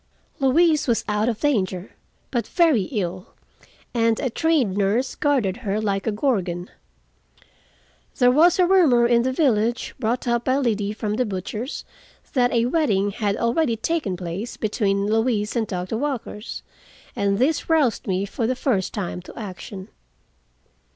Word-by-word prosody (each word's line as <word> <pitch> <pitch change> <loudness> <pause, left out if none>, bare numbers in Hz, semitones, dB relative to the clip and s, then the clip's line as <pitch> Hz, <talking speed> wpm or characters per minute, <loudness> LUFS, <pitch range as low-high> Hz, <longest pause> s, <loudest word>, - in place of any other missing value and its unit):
Louise 305 +3 +3
was 235 -2 +1
out 210 +2 +1
of 225 -2 -3
danger, 195 -9 0 0.4
but 240 -3 -1
very 320 - +3
ill, 185 -4 -4 0.6
and 230 -2 +2
a 260 -4 -1
trained 290 - +1
nurse 210 +6 +1
guarded 255 -10 +1
her 210 -4 -2
like 200 -2 -1
a - - +2
gorgon. 195 -7 -1 1.5
There 245 -2 +5
was 320 +6 +5
a 365 - +5
rumor 325 -11 +5
in 235 0 +4
the 260 +2 0
village, 240 -5 +1
brought 235 +3 -1
up 235 0 0
by 260 +1 +2
Liddy 215 -6 0
from 215 0 -3
the 250 - +1
butcher's, 210 - -5 0.5
that 245 -3 +3
a 235 -1 +2
wedding 220 -9 +1
had 205 -1 -1
already 235 +1 +1
taken 225 - -2
place 180 +6 -5
between 200 -2 0
Louise 220 0 0
and 225 -2 0
Doctor 185 +4 -3
Walker 270 -7 -3 0.8
and 200 0 +1
this 290 +8 +1
roused 300 -9 +2
me 190 0 0
for 225 +3 -2
the 255 - 0
first 220 -8 -1
time 185 -3 -3
to 180 - -13
action. 190 -1 -8
230 Hz, 150 wpm, -23 LUFS, 200-260 Hz, 1.5 s, There